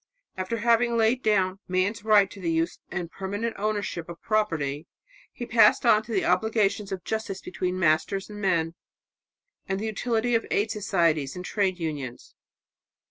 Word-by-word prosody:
After 185 +5 -3
having 235 +1 +2
laid 230 +3 +2
down 195 -4 +1
man's 185 +4 0
right 210 -2 +5
to 200 - -11
the 170 - -1
use 165 +1 -1
and 175 -1 -4
permanent 205 +4 -3
ownership 205 -5 -2
of 170 - -8
property, 165 -10 -1 0.4
he 240 - -6
passed 225 -2 +5
on 210 - +6
to 225 +2 -11
the 195 -4 +1
obligations 210 +1 +1
of 190 -2 -4
justice 220 -3 -3
between 180 +2 -3
masters 185 +3 +1
and 210 -1 -9
men, 170 -4 +1 1.0
and 190 0 -1
the 215 - -3
utility 230 +2 -1
of 230 - +1
aid 210 +1 +1
societies 170 -9 +1
and 180 0 -6
trades 190 -3 0
unions. 145 -7 -5
195 Hz, 160 wpm, -26 LUFS, 175-220 Hz, 1.0 s, on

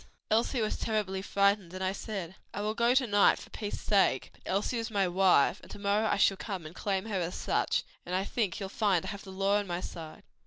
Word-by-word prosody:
"Elsie 230 +3 +2
was 215 - -1
terribly 205 -4 -1
frightened 200 -2 +1
and 185 - -4
I 185 - +1
said, 195 -3 -5 0.2
'I 205 - -2
will 210 +1 -1
go 235 +2 +3
to 265 -1 +4
night 205 -3 +4
for - - -12
peace 210 -1 -5
sake; 200 -2 +2
but - - -24
Elsie 205 +5 0
is 225 - -3
my 200 -3 +1
wife, 180 -1 +4
and - - -15
to - - -8
morrow 205 +2 +1
I - - +1
shall 195 -1 +4
come 190 -6 -5
and 155 - -8
claim 195 +1 -2
her 205 -4 -2
as 175 0 -3
such, - - 0 0.2
and 180 - -3
I 190 - +1
think 205 -3 -1
you'll 195 -2 -4
find 195 -4 +1
I - - -4
have 200 -1 -7
the 190 - -9
law 195 +2 +2
on 205 - -4
my 175 0 -2
side.' 165 -3 -8
200 Hz, 245 wpm, -30 LUFS, 190-215 Hz, 0.2 s, to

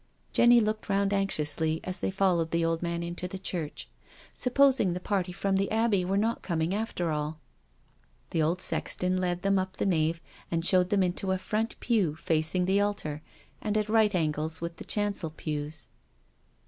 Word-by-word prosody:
Jenny 240 0 +6
looked 215 -1 -1
round 200 0 +1
anxiously 160 -5 0
as 185 0 -4
they - - -1
followed 185 -4 +1
the 165 0 +1
old 165 0 0
man 170 0 -2
into 175 +1 -4
the 190 - -6
church. 175 -5 -4 0.5
Supposing 260 -6 +4
the 180 - -3
party 185 -1 -1
from 195 +1 0
the 195 +1 0
Abbey 220 -4 +2
were 190 +2 0
not 225 +3 0
coming 165 0 -1
after 200 -6 -2
all 150 0 -2
I 70 - -33 0.3
The 165 - +1
old 170 +4 +1
sexton 185 0 +1
led 180 -1 -1
them 195 0 +3
up 185 0 -4
the - - -1
nave, 165 -3 +1 0.3
and 165 0 -1
showed 180 -1 +4
them 200 -2 +3
into 185 +1 -1
a - - 0
front 215 +4 -2
pew 200 -11 +1
facing 160 +3 0
the 195 +2 +3
altar, 155 -8 -2 0.4
and 215 0 -1
at 215 0 -1
right 215 -2 +3
angles 155 -1 -1
with 170 0 -5
the - - -8
chancel 205 -5 0
pews. 150 -1 -4
180 Hz, 185 wpm, -28 LUFS, 165-200 Hz, 0.5 s, Jenny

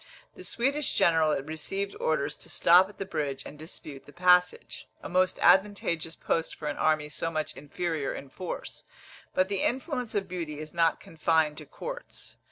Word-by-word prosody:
The - - -11
Swedish 275 +5 0
general 160 -6 +3
received 195 +6 -3
orders 155 -3 0
to - - -12
stop 180 +3 +6
at 205 - -15
the 195 - -4
bridge 140 -6 -3
and 150 - -10
dispute 155 -3 -9
the - - -12
passage 180 +2 +2 0.2
a - - -4
most 185 +1 +2
advantageous 175 -4 +3
post 165 -1 -1
for 150 - -6
an 145 - -2
army 155 -1 +2
so 160 +2 -3
much 155 -2 -3
inferior 155 0 -3
in 135 - -7
force; 180 +6 -6 0.5
but 185 0 +3
the 195 -1 -1
influence 255 -2 -1
of 195 -2 0
beauty 165 -5 -5
is 155 0 -8
not 165 -1 +2
confined 160 -1 +1
to - - -11
courts. - - -8
170 Hz, 175 wpm, -28 LUFS, 155-195 Hz, 0.5 s, stop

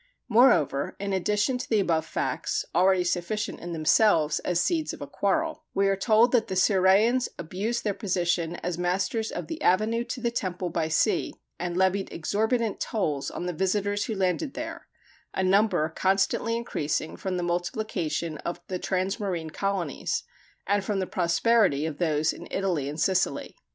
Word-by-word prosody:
Moreover, 220 - +3
in 200 0 -2
addition 210 +6 +1
to - - -6
the 220 - +3
above 165 -4 +1
facts, - - -2
already 185 +1 +4
sufficient 180 +4 -2
in 175 - -7
themselves 160 -1 +3
as 180 -1 0
seeds 320 - 0
of 145 -1 -8
quarrel, 315 +10 -1
we 195 0 +3
are 195 - +2
told 220 +4 +4
that 240 -3 +2
the 190 - -3
Cirrhæans 195 +6 +4
abused 200 +8 -3
their 205 - 0
position 175 -4 -1
as 175 -1 -2
masters 195 +5 0
of - - -4
the 325 -1 -6
avenue 220 +4 +2
to 250 - -5
the 235 -1 -1
temple 180 -5 -3
by 165 -1 0
sea, 160 - +1 0.2
and 175 0 -3
levied 190 +1 +1
exorbitant 220 +6 0
tolls 155 -10 -1
on - - -5
the 180 - -2
visitors 205 +3 0
who 225 - -3
landed 195 - -1
there - - -6 0.5
a 190 - 0
number 195 -4 +3
constantly 195 +6 +1
increasing 155 -9 -2
from 185 -1 -3
the 175 - -2
multiplication 175 -3 -2
of 175 - -4
the 185 -1 -2
transmarine 185 -4 -2
colonies, 195 -7 -2 0.4
and 200 0 +1
from 205 0 -1
the 190 - 0
prosperity 180 -3 +2
of 155 -2 -5
those 155 -2 +1
in 175 - -10
Italy 175 -8 -1
and 150 +2 -6
Sicily. 190 +2 0
190 Hz, 165 wpm, -27 LUFS, 175-215 Hz, 0.5 s, already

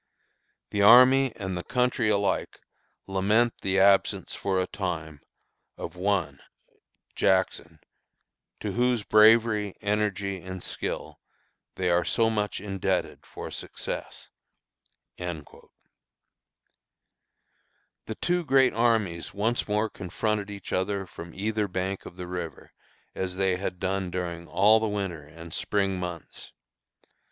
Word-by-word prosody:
The 100 - 0
army 130 +5 +7
and 95 -2 -4
the 90 - -4
country 125 -3 +1
alike 100 -1 0 0.5
lament 105 +5 +2
the 95 0 +1
absence 100 0 +3
for 95 -1 -1
a 95 - +1
time 80 -7 -5 0.6
of - - -7
one 95 -1 -1 0.8
[Jackson] 90 -4 +1 0.8
to - - -2
whose 120 -2 +1
bravery, 110 -2 +4
energy, 100 -2 -1
and 95 0 -7
skill - - -5 0.6
they 90 - -1
are 85 0 +3
so 115 -1 +2
much 105 -2 -1
indebted 95 -1 -2
for - - -8
success." - - -6 0.9
The 85 -5 -7 2.5
two 175 0 +1
great 135 -3 +4
armies 110 -8 0
once 110 +4 0
more 105 +1 +1
confronted 105 +2 -3
each 100 -1 -7
other 95 +1 -1
from 85 -1 -10
either 105 +1 -1
bank 95 +1 -3
of - - -11
the 90 0 -6
river, 90 -2 -6 0.4
as 95 -1 -3
they 95 -1 +1
had 90 -1 -4
done 95 0 -1
during 85 -1 -4
all 105 +3 +5
the 110 - -1
winter 95 -7 -3
and 80 +1 -11
spring 95 -2 0
months. 90 -2 -7
100 Hz, 120 wpm, -27 LUFS, 90-105 Hz, 2.5 s, army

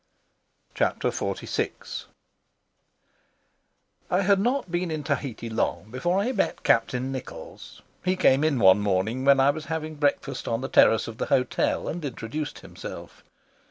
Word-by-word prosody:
Chapter - - 0
XLVI - - -3 2.0
HAD 195 +1 +3
not 245 -2 0
been 175 0 -1
in 155 -2 -3
Tahiti 140 -5 -3
long 110 -1 -2
before 175 +9 0
I 210 +6 +1
met - - -1
Captain 125 +3 +2
Nichols. 130 -1 -9 0.2
He 185 +1 +1
came 140 -6 +4
in 155 -3 +2
one 95 -2 +6
morning 105 +6 0
when 140 -1 +6
I 135 +1 +5
was 155 +1 -7
having 155 -1 -4
breakfast 145 -1 -1
on 115 +1 -1
the 135 - -4
terrace 110 - +5
of 115 -1 -8
the - - -1
hotel 125 -1 +1
and 175 +1 -4
introduced 140 +3 -5
himself. - - -10
140 Hz, 140 wpm, -26 LUFS, 115-170 Hz, 2.0 s, one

